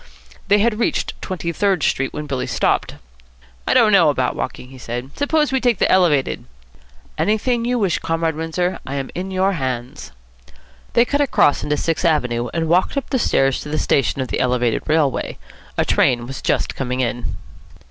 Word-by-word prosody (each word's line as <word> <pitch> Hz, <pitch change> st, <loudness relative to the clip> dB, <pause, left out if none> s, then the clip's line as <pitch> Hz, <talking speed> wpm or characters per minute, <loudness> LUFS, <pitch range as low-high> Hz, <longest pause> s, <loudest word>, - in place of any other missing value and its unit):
They 205 Hz, -, +5 dB
had 215 Hz, +1 st, +1 dB
reached 235 Hz, -, 0 dB
Twenty 175 Hz, -3 st, -3 dB
Third 190 Hz, -3 st, +1 dB
Street 135 Hz, 0 st, 0 dB
when 150 Hz, -, -5 dB
Billy 135 Hz, -3 st, -3 dB
stopped. -, -, 0 dB, 0.7 s
"I -, -, +2 dB
don't 215 Hz, -2 st, +5 dB
know 175 Hz, -6 st, +6 dB
about 130 Hz, -3 st, 0 dB
walking," 125 Hz, -1 st, -5 dB
he 130 Hz, -1 st, -13 dB
said. 120 Hz, +2 st, -5 dB
"Suppose 300 Hz, +1 st, +1 dB
we 265 Hz, -1 st, +1 dB
take 245 Hz, -4 st, +2 dB
the -, -, +2 dB
Elevated?" 160 Hz, -, +2 dB, 0.7 s
"Anything 230 Hz, +3 st, +1 dB
you 245 Hz, +1 st, +1 dB
wish, 195 Hz, -7 st, +1 dB
Comrade 165 Hz, -1 st, -1 dB
Windsor. 165 Hz, +3 st, -2 dB
I 135 Hz, -, -5 dB
am 135 Hz, -1 st, -4 dB
in 185 Hz, +2 st, -4 dB
your 190 Hz, +1 st, +1 dB
hands." 130 Hz, -6 st, -4 dB, 0.8 s
They 235 Hz, -, +5 dB
cut 285 Hz, +3 st, 0 dB
across 255 Hz, -, +3 dB
into 150 Hz, 0 st, 0 dB
Sixth 165 Hz, +2 st, -1 dB
Avenue, 125 Hz, -8 st, +1 dB
and 165 Hz, -1 st, -1 dB
walked 180 Hz, -, +2 dB
up 275 Hz, -, -3 dB
the 260 Hz, -, +1 dB
stairs 135 Hz, -, +2 dB
to 150 Hz, -, -8 dB
the 155 Hz, -, -1 dB
station 135 Hz, 0 st, +1 dB
of 130 Hz, -, -4 dB
the -, -, -2 dB
Elevated 125 Hz, -2 st, +1 dB
Railway. 155 Hz, -3 st, 0 dB, 0.4 s
A -, -, +2 dB
train 120 Hz, -1 st, +2 dB
was 135 Hz, +2 st, -7 dB
just -, -, 0 dB
coming 130 Hz, -1 st, -2 dB
in. 120 Hz, -4 st, -2 dB
160 Hz, 185 wpm, -20 LUFS, 130-200 Hz, 0.8 s, know